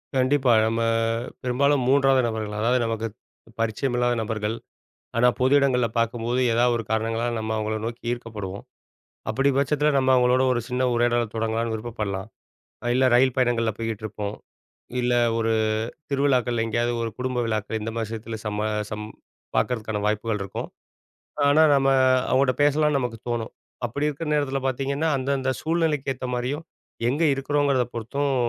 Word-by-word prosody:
கண்டிப்பா. 130 0 +3 0.2
நம்ம 115 +1 0 0.6
பெரும்பாலும் 135 +2 +2
மூன்றாவது 135 -1 +4
நபர்கள். 110 -2 -4
அதாவது 120 +3 +2
நமக்கு 115 0 -2 0.5
பரிச்சயமில்லாத 120 +2 0
நபர்கள். 110 0 -2 0.6
ஆனா 120 +1 +5
பொது 130 +2 +3
இடங்கள்ல 125 -3 +2
பார்க்கும்போது, 115 +2 0
ஏதாவது 120 +1 +3
ஒரு 115 - -4
காரணங்களால, 115 +2 0
நம்ம 110 0 -3
அவங்கள 110 0 -1
நோக்கி 115 +1 -6
ஈர்க்கப்படுவோம். 105 -5 -6 0.7
அப்பிடி 135 +6 +2
பட்சத்தில, 145 +2 +2
நம்ம 130 -1 +2
அவங்களோட 125 0 +4
ஒரு 120 - 0
சின்ன 125 +1 -1
உரையாடல 120 0 +2
தொடங்கலான்னு 115 +1 -1
விருப்பப்படலாம். 110 -3 -4 0.6
அ - - -3
இல்ல, 130 +1 +3
ரயில் 130 +1 +4
பயணங்கள்ல 120 -3 +2
போய்கிட்டிருப்போம். 110 -2 -4 0.6
இல்ல, 125 0 +1 0.2
ஒரு 115 0 +1 0.6
திருவிழாக்கள்ல 130 -4 +1
எங்கேயாவது 120 +2 0
ஒரு 115 - -2
குடும்ப 125 -1 -1
விழாக்கள் 110 0 -2
இந்த 110 +1 -3
மாரி 115 -1 -1
விஷயத்தில 115 +1 -6
சம்ம 105 +1 -1 0.2
சம் 105 0 -5 0.5
பார்க்கறதுக்கான 110 -4 -1
வாய்ப்புகள் 105 0 0
இருக்கும். 100 - -5 0.8
ஆனா, 145 +2 +5
நம்ம 135 -1 +2 0.4
அவங்கள்கிட்ட 130 -1 +3
பேசலாம்னு 150 0 +3
நமக்கு 120 -3 -3
தோணும். 120 -1 -2 0.3
அப்பிடி 140 +6 -1
இருக்கிற 150 +2 -5
நேரத்தில 140 -2 0
பார்த்தீங்கன்னா, 140 +4 -1
அந்தந்த 135 0 -1
சூழ்நிலைக்கு 155 -4 0
ஏத்த 130 0 -5
மாரியும், 130 +6 -2 0.5
எங்க 145 +6 0
இருக்கிறோங்கிறத 135 -1 +1
பொறுத்தும், 140 +5 -1
120 Hz, 140 wpm, -24 LUFS, 115-135 Hz, 0.8 s, ஆனா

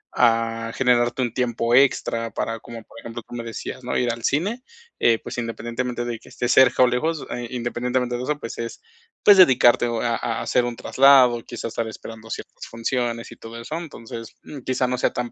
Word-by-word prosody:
a 115 -1 +2
generarte 125 0 +2
un 120 - -2
tiempo 120 -2 0
extra 115 -3 +3
para, 115 0 -3
como 115 0 -10
por - - -14
ejemplo, 115 0 -8
tú - - -12
me 120 -1 -4
decías, 115 +2 -7
¿no? 125 - -1
Ir 120 -1 +1
al 115 -1 -9
cine, 200 - 0 0.4
eh, 115 -1 +4
pues, - - -8
independientemente 120 +1 -3
de 120 -2 -4
que - - -17
esté 120 - -3
cerca 130 0 +6
o 125 - +6
lejos, 150 +6 -1
eh, 120 -1 -4
independientemente 125 0 -1
de 125 - -5
eso, 150 +2 -1
pues 115 - -7
es, 115 0 -5 0.4
pues 205 -2 +8
dedicarte 125 -8 +6
a 115 0 0
a 115 - -3
hacer 125 - +1
un 120 -1 -3
traslado, 130 -3 +5
quizás 120 - -7
estar 115 0 -2
esperando 110 0 -10
ciertas - - -7
funciones, 115 0 -2
y - - -10
todo 115 +1 -9
eso. 125 +7 -6
Entonces, 115 -8 -8
mm, 145 - -9
quizá 130 0 0
no 125 0 -1
sea - - +1
tan 120 -1 -3
120 Hz, 205 wpm, -23 LUFS, 115-125 Hz, 0.4 s, pues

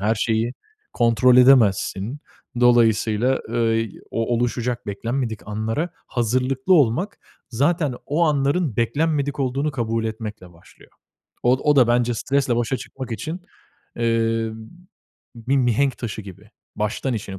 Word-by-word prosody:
her 110 +3 +1
şeyi 115 +2 0 0.4
kontrol 120 +1 +4
edemezsin. 125 -2 +4 0.4
Dolayısıyla, 120 +1 +3
ııı, 115 -1 +1
y 115 -3 -3
o 115 +1 -1
oluşacak 120 0 -2
beklenmedik 115 +2 -3
anlara 110 +11 -2 0.2
hazırlıklı 130 - +1
olmak, 165 - +2 0.3
zaten 145 +3 +1
o 150 +4 0
anların 145 - +1
beklenmedik 145 +3 0
olduğunu 135 +3 0
kabul 115 -4 -2
etmekle 110 -5 -6
başlıyor. 85 - -20 0.5
Od 125 +2 +3
o 150 -1 +3
da 125 -3 +5
bence 120 0 +2
stresle 135 0 0
başa 120 +2 0
çıkmak 130 -1 -8
için, 160 +10 -5 0.6
eee, 115 -1 0 0.8
bir 120 +4 -1
mihenk 130 +2 +1
taşı 110 -2 -5
gib, 95 -1 -11
i 105 +1 -20 0.3
baştan 110 +5 -2
işini 100 -3 -6
120 Hz, 130 wpm, -22 LUFS, 110-135 Hz, 0.8 s, da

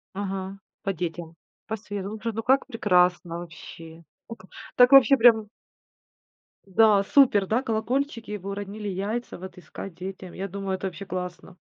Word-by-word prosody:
Ага, 195 -1 -4 0.3
по 195 - -1
детям, 170 -1 -5 0.3
по 220 - -2
сверу 205 -2 -6
Слушай, 230 0 -3
ну 225 - -3
как 265 +3 +3
прекрасно 180 -7 +1
вообще. 165 0 -11 0.2
О, 230 - -7
ка 190 - -18 0.3
так 245 +1 +6
вообще, 275 0 +8
прям 225 -3 +5 1.2
Да, 200 +1 +4
супер, 210 -5 +4
да, 225 +6 +1
колокольчики. 230 -1 -2
Вы 200 +1 -7
уронили 205 +1 -6
яйца 205 +5 -3
вот 185 +1 -10
искать 180 +1 -9
детям. 185 0 -8
Я 195 +2 -5
думаю, 195 0 -3
это 190 +1 -4
вообще 185 +2 -8
классно. 180 0 -6
195 Hz, 155 wpm, -25 LUFS, 185-225 Hz, 1.2 s, вообще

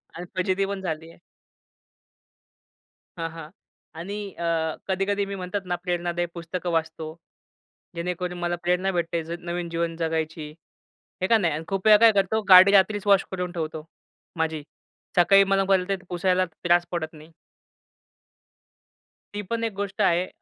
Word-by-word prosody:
आणि 175 - -6
फजिती 185 +1 +1
पण 195 -1 -4
झाली 165 -2 -4
आहे. - - -16 2.0
हां, 165 0 -2
हां. 165 -2 -9 0.5
आणि 200 +4 -5 0.2
अ, 170 0 -2 0.4
कधी-कधी 195 +1 0
मी 200 0 -5
म्हणतात 185 +2 -4
ना, - - +2
प्रेरणादायी 175 -1 -1
पुस्तकं 175 +1 -5
वाचतो. 160 -1 -2 0.9
जेणेकरून 180 +1 -3
मला 175 0 -1
प्रेरणा 180 +2 +1
भेटते, 170 -1 -1 0.2
नवीन 175 0 -4
जीवन 165 0 -2
जगायची. 160 -2 -2 0.7
हे 185 - +1
का 230 - +5
नाही? 170 -7 +1
आणि 155 +2 -4
खूप 195 0 -3
वेळा 210 -1 +9
काय 230 -1 +7
करतो, 205 +2 +1
गाडी 185 +2 +10
रात्रीच 205 +1 +3
वॉश 200 -1 +5
करून 180 -1 -3
ठेवतो 155 -2 -5 0.5
माझी, 160 -2 -1 0.5
सकाळी 195 +3 +6
मला 195 0 +2
परत 190 0 +1
पुसायला 185 +1 +1
त्रास 175 +1 +1
पडत 160 -2 -3
नाही. 155 +2 -14 2.0
ती 205 - -3
पण 230 0 -1
एक 225 -3 -1
गोष्ट 200 0 -4
आहे. 175 +2 +3
180 Hz, 145 wpm, -25 LUFS, 165-195 Hz, 2.0 s, गाडी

